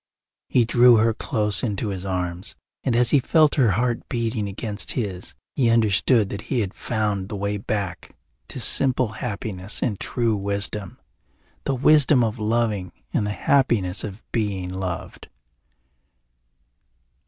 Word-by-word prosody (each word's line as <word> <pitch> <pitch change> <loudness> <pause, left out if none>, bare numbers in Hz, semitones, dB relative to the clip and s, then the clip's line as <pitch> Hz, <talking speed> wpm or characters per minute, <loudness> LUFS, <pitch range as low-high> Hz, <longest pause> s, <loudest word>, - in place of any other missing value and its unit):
He 120 -2 +3
drew 120 +1 +6
her 110 +1 +3
close 105 -3 0
into 105 -2 -2
his 95 -1 -5
arms, 90 0 -4 0.3
and 125 -4 0
as 120 0 +3
he 145 - +5
felt 155 +3 +3
her 130 -6 +3
heart 120 +3 -1
beating 115 -3 -2
against 105 +1 -3
his 100 -7 -4 0.2
he 125 -4 +2
understood 110 0 +3
that 100 - -5
he 125 - +1
had 100 -3 -3
found 105 -4 -2
the 105 - -5
way 100 +1 -2
back 100 -4 -4 0.3
to - - -6
simple 130 -3 +4
happiness 105 -3 -3
and 105 -7 -1
true 115 -3 0
wisdom, 100 -1 -2 0.7
the 135 - 0
wisdom 145 -1 +5
of 110 +1 -2
loving 105 -4 -1 0.2
and 105 - 0
the - - -2
happiness 105 -7 +1
of 105 0 -7
being 95 -5 -2
loved. 95 -3 -6
105 Hz, 140 wpm, -23 LUFS, 100-120 Hz, 0.7 s, drew